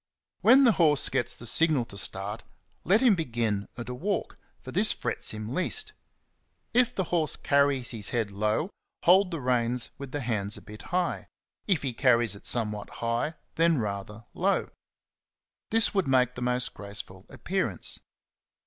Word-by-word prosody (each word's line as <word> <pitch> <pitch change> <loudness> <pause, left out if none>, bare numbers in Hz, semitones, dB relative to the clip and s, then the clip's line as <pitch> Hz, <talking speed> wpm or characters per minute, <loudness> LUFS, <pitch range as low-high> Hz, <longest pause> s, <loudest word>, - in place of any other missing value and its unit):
When 260 +4 +6
the 245 - +6
horse 155 -8 +3
gets 120 - +1
the 120 - -6
signal 150 0 +3
to 100 - -11
start, 100 +2 -4 0.4
let 200 +8 +3
him 250 -5 +6
begin 115 - -1
at 120 - -6
a 125 - -4
walk, 195 +11 -3 0.2
for - - -10
this - - +4
frets - - -2
him 110 +2 -5
least. 425 - -2 0.8
If 245 0 +3
the 190 - 0
horse 160 -3 +2
carries 140 -3 +2
his 110 -4 -3
head 115 -4 -1
low, 110 - -1 0.3
hold 185 +2 +5
the 165 -3 -4
reins 125 -1 0
with 140 -2 -7
the 145 - -3
hands 105 -4 -1
a - - -11
bit 105 0 -11
high; 180 0 -1 0.4
if 190 -8 +1
he 130 -3 -2
carries 120 -2 +3
it 100 - -6
somewhat 105 -3 +1 0.2
high, 120 +7 -1 0.2
then 165 -1 +4
rather 105 0 -4
low: - - 0 1.0
this 225 0 +3
would 195 -6 +1
make 125 -2 +3
the 125 - -8
most 125 0 -1
graceful 100 -2 -5
appearance. - - -3
125 Hz, 165 wpm, -27 LUFS, 110-165 Hz, 1.0 s, When